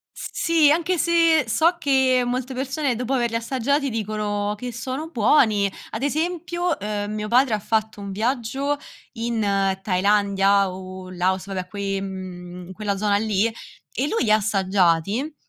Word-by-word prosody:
S -, -, -6 dB
sì. 325 Hz, -3 st, +3 dB
Anche 340 Hz, +3 st, +1 dB
se 330 Hz, -2 st, +4 dB
so 330 Hz, +10 st, +3 dB
che 265 Hz, -4 st, +3 dB
molte 255 Hz, +1 st, -2 dB
persone 270 Hz, +1 st, -1 dB
dopo 250 Hz, +3 st, -2 dB
averli 235 Hz, -3 st, 0 dB
assaggiati 270 Hz, +4 st, 0 dB
dicono 210 Hz, -2 st, -2 dB
che 245 Hz, +3 st, -6 dB
sono 260 Hz, +6 st, -5 dB
buoni. 220 Hz, -6 st, +3 dB, 0.2 s
Ad 220 Hz, -, -5 dB
esempio, 345 Hz, +4 st, -1 dB
uhm, 205 Hz, 0 st, -3 dB
mio 210 Hz, 0 st, -3 dB
padre 245 Hz, +1 st, +3 dB
ha -, -, 0 dB
fatto 220 Hz, 0 st, -1 dB
un 200 Hz, -1 st, -6 dB
viaggio 260 Hz, +6 st, -1 dB, 0.3 s
in 230 Hz, -1 st, -2 dB, 0.4 s
Thailandia 200 Hz, 0 st, +2 dB
o 185 Hz, 0 st, -8 dB
in 185 Hz, -, -10 dB
Laos, 185 Hz, +1 st, 0 dB
vabbè 190 Hz, -2 st, -4 dB
que 200 Hz, +1 st, -3 dB
ehm, 185 Hz, -2 st, -7 dB
quella 200 Hz, +1 st, -2 dB
zona 205 Hz, 0 st, +1 dB
lì 210 Hz, 0 st, +1 dB, 0.5 s
e 270 Hz, +4 st, 0 dB
lui 455 Hz, -, 0 dB
li 215 Hz, -, 0 dB
assaggiati 200 Hz, -, +2 dB
220 Hz, 150 wpm, -23 LUFS, 200-270 Hz, 0.5 s, se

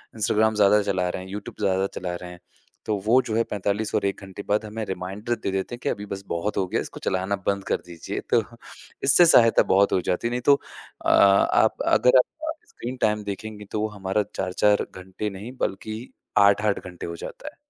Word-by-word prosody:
Instagram 110 Hz, 0 st, +2 dB
ज़्यादा 105 Hz, 0 st, +5 dB
चला 95 Hz, -2 st, 0 dB
रहे 90 Hz, -, -4 dB
हैं, 95 Hz, -, -11 dB
यूट्यूब 100 Hz, 0 st, -7 dB
ज़्यादा 95 Hz, -1 st, +1 dB
चला 90 Hz, -1 st, -3 dB
रहे 90 Hz, 0 st, -8 dB
हैं। 90 Hz, -, -12 dB, 0.5 s
तो 105 Hz, -1 st, 0 dB
वो, 120 Hz, +4 st, +5 dB
जो 110 Hz, -4 st, -4 dB
है, 115 Hz, -, +3 dB
45 105 Hz, 0 st, -2 dB
और -, -, +1 dB
1 100 Hz, +1 st, -2 dB
घंटे 95 Hz, +1 st, -8 dB
बाद 105 Hz, +2 st, +1 dB
हमें 110 Hz, +1 st, -5 dB
रिमाइंडर 95 Hz, +5 st, -3 dB
दे 110 Hz, -4 st, -4 dB
देते 95 Hz, +5 st, -2 dB
हैं -, -, -16 dB
कि, -, -, 0 dB
"अभी 105 Hz, -2 st, -3 dB
बस 95 Hz, 0 st, -7 dB
बहुत 85 Hz, +5 st, -2 dB
हो 95 Hz, -, +2 dB
गया। -, -, -1 dB
इसको -, -, -8 dB
चलाना 95 Hz, +2 st, 0 dB
बंद 100 Hz, -1 st, +1 dB
कर -, -, +3 dB
दीजिए।" 85 Hz, -2 st, -6 dB
तो -, -, +5 dB, 0.6 s
इससे 155 Hz, +6 st, +6 dB
सहायता 115 Hz, -8 st, +6 dB
बहुत 100 Hz, +1 st, +4 dB
हो 90 Hz, -, +2 dB
जाती 90 Hz, +6 st, -1 dB
है। -, -, -3 dB
नहीं 125 Hz, +1 st, -2 dB
तो -, -, +8 dB, 0.5 s
अ, -, -, +3 dB
आप 100 Hz, 0 st, +4 dB
अगर 125 Hz, +1 st, +5 dB
आप 125 Hz, -, +5 dB, 0.4 s
स्क्रीन 125 Hz, +2 st, -7 dB
टाइम 105 Hz, -1 st, +1 dB
देखेंगे, 105 Hz, +1 st, -6 dB
तो 105 Hz, -, -1 dB
वो 110 Hz, -, +1 dB
हमारा 95 Hz, +2 st, 0 dB
4-4 100 Hz, +2 st, +2 dB
घंटे 95 Hz, +3 st, -5 dB
नहीं, 100 Hz, +4 st, -8 dB
बल्कि 110 Hz, +1 st, -3 dB, 0.4 s
8-8 100 Hz, +1 st, +4 dB
घंटे 90 Hz, -1 st, -8 dB
हो 85 Hz, -, -5 dB
जाता -, -, -9 dB
है। -, -, -23 dB
100 Hz, 215 wpm, -24 LUFS, 95-110 Hz, 0.6 s, तो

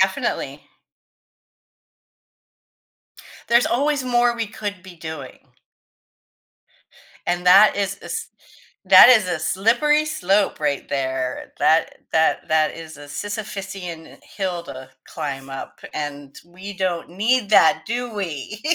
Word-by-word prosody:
Definitely. -, -, -1 dB, 2.9 s
There's 235 Hz, +1 st, +4 dB
always 280 Hz, +2 st, 0 dB
more 240 Hz, -1 st, +2 dB
we 225 Hz, -2 st, -3 dB
could 205 Hz, -3 st, -6 dB
be 185 Hz, -2 st, -13 dB
doing. 160 Hz, -4 st, -8 dB, 1.9 s
And 180 Hz, 0 st, -1 dB
that 195 Hz, +3 st, +7 dB
is 200 Hz, 0 st, -2 dB
a -, -, -12 dB
s 455 Hz, 0 st, -5 dB, 0.6 s
that 190 Hz, +6 st, +10 dB
is 220 Hz, -7 st, +5 dB
a 175 Hz, -3 st, -2 dB
slippery 240 Hz, -, +2 dB
slope 200 Hz, -, 0 dB
right 145 Hz, -2 st, -1 dB
there. 130 Hz, -2 st, -3 dB
That 155 Hz, +2 st, +2 dB
that 160 Hz, +1 st, +1 dB
that 155 Hz, -1 st, +2 dB
is 160 Hz, -2 st, -10 dB
a 145 Hz, -, -11 dB
Sisyphician 195 Hz, -2 st, -7 dB
hill 185 Hz, -3 st, -4 dB
to 130 Hz, -4 st, -10 dB, 0.2 s
climb 135 Hz, -1 st, -6 dB
up 135 Hz, -, -8 dB
and 145 Hz, -2 st, -6 dB
we 185 Hz, +4 st, -10 dB
don't 185 Hz, -3 st, -2 dB
need 215 Hz, +4 st, +1 dB
that, 195 Hz, -2 st, +5 dB
do 240 Hz, 0 st, -3 dB
we? 195 Hz, +1 st, -5 dB
185 Hz, 120 wpm, -21 LUFS, 155-215 Hz, 2.9 s, that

